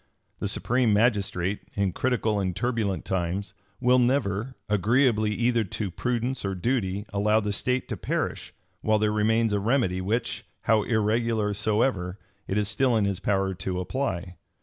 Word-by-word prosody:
The - - -1
supreme 125 -2 +1
magistrate, 100 -4 +1 0.2
in 100 -2 +1
critical 115 -4 0
and 95 -2 -1
turbulent 115 -4 -1
times, 95 +2 -2 0.3
will 125 0 +4
never, 125 -2 +1
agreeably 110 +2 +3
either 115 +2 +1
to 100 0 -4
prudence 125 +5 -2
or 100 -1 -2
duty, 100 -1 -1
allow 105 +2 +3
the 105 -1 -2
state 125 +5 -1
to - - -3
perish, - - -3 0.3
while 110 0 +3
there 105 0 +1
remains 110 +1 +2
a 100 - +2
remedy 105 -4 +1
which, 110 +6 -2 0.2
how 110 -1 +3
irregular 110 -1 +1
soever, 100 -3 0 0.3
it 95 - -1
is 105 -1 +1
still 120 +2 +2
in 105 - +2
his 100 -2 -1
power 95 -1 0
to 90 0 -3
apply. 90 -4 -3
105 Hz, 155 wpm, -26 LUFS, 100-120 Hz, 0.3 s, will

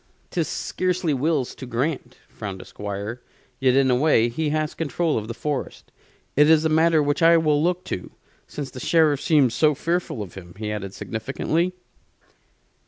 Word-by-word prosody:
"'Tis - - 0
scarcely 180 -3 -1
Will's 140 -1 0
to 130 - -9
grant," 130 +1 -2
frowned 100 -3 -7
the - - -10
Squire; 105 +4 -6 0.4
"yet, 130 -1 +3
in 135 -1 +4
a - - +4
way, 125 -4 +3
he 150 +6 -2
has 155 0 -1
control 165 0 -1
of 110 -1 -2
the 115 - -4
forest. 145 -1 -4 0.4
It 150 +2 +5
is 160 0 +5
a - - +3
matter 160 0 +4
which 145 +2 0
I 165 0 +7
will 150 -2 +2
look 180 +2 0
to, 90 - -5 0.4
since 145 -3 -6
the 130 - -8
Sheriff 155 0 +3
seems 140 -7 +3
so 150 +4 +3
fearful 165 -6 -2
of 95 - -11
him," 85 -3 -11
he 105 0 -4
added, 100 -2 -5
significantly. 150 +10 -2
145 Hz, 175 wpm, -23 LUFS, 120-160 Hz, 0.4 s, I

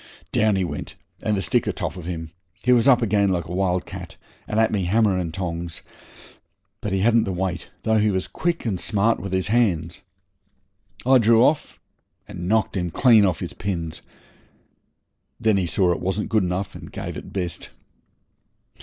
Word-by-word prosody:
Down 110 -1 +3
he 95 - +1
went 75 -4 -5 0.3
and 105 -1 0
the 95 - -1
stick 75 - +1
atop - - -2
of 90 -3 -8
him. 80 -2 -5 0.3
He 125 - +3
was 125 +1 +4
up 125 -3 +5
again 100 -2 +2
like 85 -3 0
a 85 - -9
wild 90 -1 0
cat, 95 -4 -9 0.3
and 110 - 0
at 110 0 +3
me 100 -4 0
hammer 105 +1 +3
and 90 -3 -2
tongs 85 -2 -5 1.0
but 105 - -3
he 95 0 +1
hadn't 115 +2 +4
the 95 - -2
weight, 90 -2 -3
though 110 0 +3
he 105 0 +3
was 95 -2 -1
quick 170 -3 -2
and 100 -6 -1
smart 110 +2 +1
with 100 0 -6
his 95 +1 0
hands. 95 -6 +1 1.0
I 130 0 +6
drew 115 +1 +5
off 150 +2 +1 0.5
and 90 0 -6
knocked 110 -1 +1
him 90 -1 -1
clean 110 +2 +5
off 90 - -2
his - - -5
pins. 85 -5 -4 1.4
Then 110 -3 +3
he 90 -2 0
saw 90 +2 +2
it 85 - -1
wasn't 95 +3 -2
good 110 -1 +3
enough, 90 +2 -2
and - - -10
gave - - -6
it - - -8
best. 90 -4 -4
95 Hz, 185 wpm, -23 LUFS, 90-110 Hz, 1.4 s, I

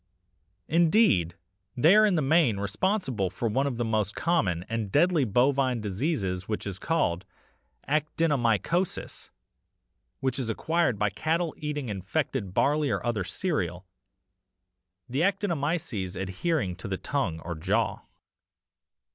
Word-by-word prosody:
Indeed 160 - +3 0.4
they 160 +10 +6
are 215 0 +6
in 195 - +2
the 155 - +1
main 140 -6 +3
responsible 110 - -1
for 105 +6 -3
one 135 +6 +1
of 130 -4 -3
the 120 - -1
most 110 -2 0
common 95 - 0
and 110 -3 -3
deadly 165 - +3
bovine 130 +2 +2
diseases 100 - -2
which 105 - -3
is 95 -2 -4
called 95 - 0 0.6
actinomycosis, 150 - 0 0.9
and 130 -1 0
is 120 -3 -2
acquired 160 +1 0
by 105 0 +1
cattle 160 - -1
eating 150 -4 -4
infected 105 - -2
barley 145 +8 +2
or 100 -1 -2
other 115 -5 0
cereal, 95 - -2 1.2
the 130 +3 -2
actinomyces 155 - -1
adhering 95 - -1
to 95 - -7
the 95 -1 -2
tongue 100 - -2
or 85 - -5
jaw. 80 -1 0
125 Hz, 125 wpm, -27 LUFS, 100-160 Hz, 1.2 s, they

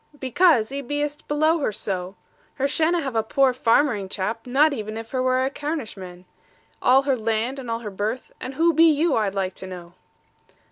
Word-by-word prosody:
'Because 260 -3 +3
'ee 280 +1 -3
be'est 290 +2 -3
below 310 +3 +2
her 275 - 0
so. 190 -2 -4 0.4
Her 275 0 0
shanna' 330 +3 +1
have 265 -4 -4
a 225 - +3
poor 265 +3 +2
farmering 230 -4 +2
chap, 220 +6 -4
not 285 +4 +3
even 215 -3 -5
if 225 0 -8
her 255 - -1
were 255 0 +2
a 270 - -2
Carnishman. 210 - -6 0.6
All 265 +2 +5
her 275 -1 +1
land, 230 +3 -1
and 250 -3 -7
all 230 0 -2
her 210 -3 -6
birth 210 +6 -4
and 260 +1 -6
who 335 +3 +3
be 325 +2 +6
you, 310 0 +2
I'd 205 -3 0
like 190 -1 -1
to 190 - -8
know?' 175 -2 -9
255 Hz, 195 wpm, -23 LUFS, 215-290 Hz, 0.6 s, be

